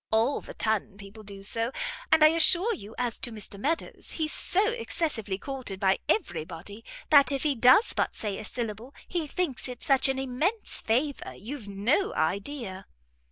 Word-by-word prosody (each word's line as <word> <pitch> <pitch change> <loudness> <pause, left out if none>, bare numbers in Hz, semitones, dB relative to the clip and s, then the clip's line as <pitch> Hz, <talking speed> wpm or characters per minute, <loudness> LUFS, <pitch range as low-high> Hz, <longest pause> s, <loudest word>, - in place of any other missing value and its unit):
All 225 +5 +2
the - - -10
ton 215 -3 -1
people 200 +2 -11
do 200 -1 -9
so, 230 +4 0 0.4
and 315 -1 +6
I 310 - +9
assure 345 +7 +5
you 220 - -9
as 245 -2 -2
to 240 - -2
Mr 210 -2 -5
Meadows, 320 +9 -1
he's 310 -2 -1
so 395 +4 +2
excessively 305 - -2
courted 250 -4 -6
by 190 -1 +2
every 175 - 0
body, 185 +7 -9 0.3
that 285 -1 +7
if 275 -1 0
he 300 -2 +2
does 255 - +5
but - - -1
say 205 -3 -3
a - - -6
syllable, 230 +3 -5
he 340 -4 -2
thinks 290 -5 -1
it 250 -1 -7
such 270 -2 +4
an 265 - 0
immense 270 - -1
favour, 265 +6 -1
you've 235 +1 -8
no 210 - 0
idea." 195 - -2
245 Hz, 175 wpm, -28 LUFS, 205-300 Hz, 0.4 s, I